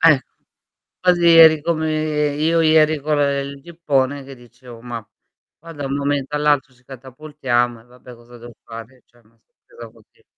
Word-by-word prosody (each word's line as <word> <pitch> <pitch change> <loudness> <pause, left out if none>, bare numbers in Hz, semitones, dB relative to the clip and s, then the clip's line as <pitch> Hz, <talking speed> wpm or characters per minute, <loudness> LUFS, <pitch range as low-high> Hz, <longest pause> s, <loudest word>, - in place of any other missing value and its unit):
Eh. 160 -5 +5 0.8
Così 175 -1 +2
eri 160 -1 +7
come 155 -2 -1
io 165 +2 +1
ieri 155 -1 +3
con 150 +1 -1
ehm, 140 -1 0
il 140 0 -11
gippone, 145 -4 -2
che 135 0 -11
dicevo: 120 -1 -15
"Ma 115 -2 -8 0.5
qua 165 +1 -12
da 145 -3 -6
un 135 - -3
momento 140 0 -2
all'altro 145 -2 0
ci 125 0 -29
catapultiamo, 130 -2 -3
e 115 - -22
vabbè 125 0 -16
cosa 120 +1 -17
devo 120 +1 -12
fare?" 115 +3 -12
Cioè 120 - -29
una 115 +2 -31
sorpresa 115 -1 -16
così. 110 -1 -26
140 Hz, 170 wpm, -19 LUFS, 120-155 Hz, 0.8 s, eri